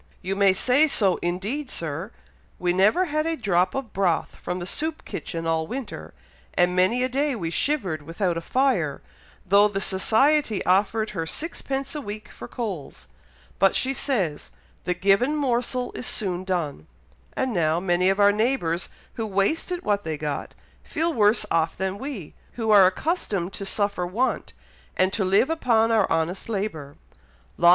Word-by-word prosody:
"You 190 Hz, +2 st, -2 dB
may 200 Hz, -1 st, +5 dB
say 255 Hz, +10 st, +4 dB
so, 200 Hz, -, +3 dB
indeed, 205 Hz, +11 st, -2 dB
Sir! 165 Hz, -, -3 dB, 0.5 s
We 175 Hz, -1 st, 0 dB
never 210 Hz, -, +4 dB
had 305 Hz, -1 st, -1 dB
a 330 Hz, 0 st, -1 dB
drop 185 Hz, -, +1 dB
of 270 Hz, -5 st, -4 dB
broth 185 Hz, -4 st, 0 dB
from 180 Hz, -, -4 dB
the 175 Hz, -, -5 dB
soup 315 Hz, -, -2 dB
kitchen 165 Hz, -1 st, -5 dB
all 160 Hz, -1 st, 0 dB
winter, 260 Hz, +3 st, -7 dB, 0.4 s
and 175 Hz, 0 st, +3 dB
many 190 Hz, +8 st, +3 dB
a -, -, +2 dB
day 275 Hz, +2 st, 0 dB
we 170 Hz, -7 st, -3 dB
shivered 190 Hz, -, 0 dB
without 170 Hz, +4 st, -2 dB
a 165 Hz, -, -3 dB
fire, 200 Hz, -, 0 dB, 0.4 s
though 200 Hz, +2 st, +5 dB
the 200 Hz, -1 st, -3 dB
society 220 Hz, +6 st, +2 dB
offered 210 Hz, +4 st, +2 dB
her 165 Hz, -5 st, -3 dB
sixpence 275 Hz, -, -4 dB
a 300 Hz, -, -4 dB
week 215 Hz, -3 st, -7 dB
for 120 Hz, -, -10 dB
coals, 195 Hz, -, -6 dB, 0.5 s
but 195 Hz, 0 st, +4 dB
she 265 Hz, +1 st, +1 dB
says 195 Hz, -, -1 dB, 0.4 s
'the 180 Hz, -, 0 dB
given 200 Hz, +10 st, +3 dB
morsel 250 Hz, -3 st, -1 dB
is -, -, -5 dB
soon 185 Hz, -3 st, -2 dB
done;' 160 Hz, -, -3 dB, 0.5 s
and 260 Hz, -, 0 dB
now, 165 Hz, -2 st, +2 dB
many 180 Hz, 0 st, +2 dB
of 195 Hz, +1 st, +1 dB
our 205 Hz, 0 st, +6 dB
neighbours 210 Hz, -6 st, 0 dB, 0.2 s
who 225 Hz, -1 st, -3 dB
wasted 315 Hz, -, 0 dB
what 205 Hz, -1 st, +1 dB
they 160 Hz, -1 st, -3 dB
got, 150 Hz, -1 st, -4 dB, 0.3 s
feel 330 Hz, +1 st, -1 dB
worse 210 Hz, -2 st, +3 dB
off 165 Hz, 0 st, +1 dB
than 190 Hz, +1 st, -2 dB
we, 260 Hz, -, -6 dB, 0.2 s
who 225 Hz, -2 st, -1 dB
are 200 Hz, -3 st, +8 dB
accustomed 195 Hz, -, -2 dB
to 195 Hz, -, -5 dB
suffer 200 Hz, -3 st, -1 dB
want, 235 Hz, +9 st, -1 dB, 0.4 s
and 185 Hz, +1 st, +2 dB
to 205 Hz, -, +1 dB
live 195 Hz, +10 st, +3 dB
upon 230 Hz, -8 st, +2 dB
our 220 Hz, -3 st, +2 dB
honest 165 Hz, +6 st, -1 dB
labour. 190 Hz, -10 st, -4 dB
200 Hz, 165 wpm, -24 LUFS, 180-250 Hz, 0.5 s, are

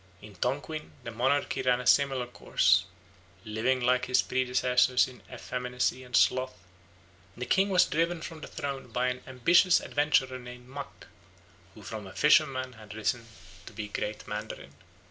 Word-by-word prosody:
In 105 Hz, -1 st, -11 dB
Tonquin 145 Hz, -, -3 dB
the 115 Hz, -, -6 dB
monarchy 130 Hz, +4 st, 0 dB
ran 125 Hz, -1 st, +2 dB
a 125 Hz, -, -6 dB
similar 135 Hz, -2 st, +3 dB
course. 95 Hz, -6 st, +2 dB, 0.6 s
Living 115 Hz, +5 st, 0 dB
like 125 Hz, +1 st, +2 dB
his 125 Hz, 0 st, +2 dB
predecessors 125 Hz, 0 st, +2 dB
in 130 Hz, -1 st, -13 dB
effeminacy 125 Hz, 0 st, -2 dB
and 125 Hz, 0 st, -5 dB
sloth, 130 Hz, -3 st, +2 dB, 0.8 s
the 125 Hz, -, -4 dB
king 195 Hz, +7 st, +2 dB
was 185 Hz, -1 st, +5 dB
driven 165 Hz, +2 st, 0 dB
from 160 Hz, 0 st, -8 dB
the -, -, -7 dB
throne 140 Hz, -1 st, -5 dB
by 125 Hz, +1 st, 0 dB
an 125 Hz, 0 st, -4 dB
ambitious 165 Hz, +8 st, +4 dB
adventurer 135 Hz, -3 st, +1 dB
named 125 Hz, 0 st, -11 dB
Mack, 140 Hz, +1 st, -9 dB, 0.7 s
who 105 Hz, -, -13 dB
from 105 Hz, 0 st, -7 dB
a 95 Hz, -, -12 dB
fisherman 135 Hz, -4 st, +3 dB
had 110 Hz, -2 st, -12 dB
risen 110 Hz, +2 st, -2 dB, 0.4 s
to -, -, -10 dB
be 105 Hz, 0 st, -6 dB
Grand 105 Hz, +1 st, -4 dB
Mandarin. 105 Hz, +1 st, -6 dB
125 Hz, 155 wpm, -29 LUFS, 120-135 Hz, 0.8 s, was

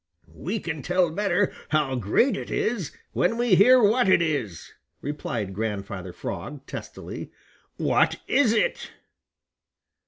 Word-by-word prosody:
"We 185 Hz, -, -3 dB
can 160 Hz, -5 st, -4 dB
tell 180 Hz, +3 st, +1 dB
better 195 Hz, +1 st, +1 dB, 0.2 s
how 150 Hz, -4 st, +1 dB
great 125 Hz, -, +2 dB
it -, -, -6 dB
is 215 Hz, -, -1 dB, 0.2 s
when 230 Hz, -, +1 dB
we 240 Hz, -4 st, +2 dB
hear 250 Hz, +8 st, +7 dB
what 225 Hz, 0 st, +4 dB
it -, -, +6 dB
is," 140 Hz, -, -2 dB, 0.3 s
replied 115 Hz, -9 st, -4 dB
Grandfather 100 Hz, -3 st, -4 dB
Frog 135 Hz, +9 st, -6 dB
testily. -, -, -8 dB, 0.5 s
"What -, -, +2 dB
is 265 Hz, -5 st, +4 dB
it?" -, -, 0 dB
165 Hz, 125 wpm, -25 LUFS, -, 0.5 s, hear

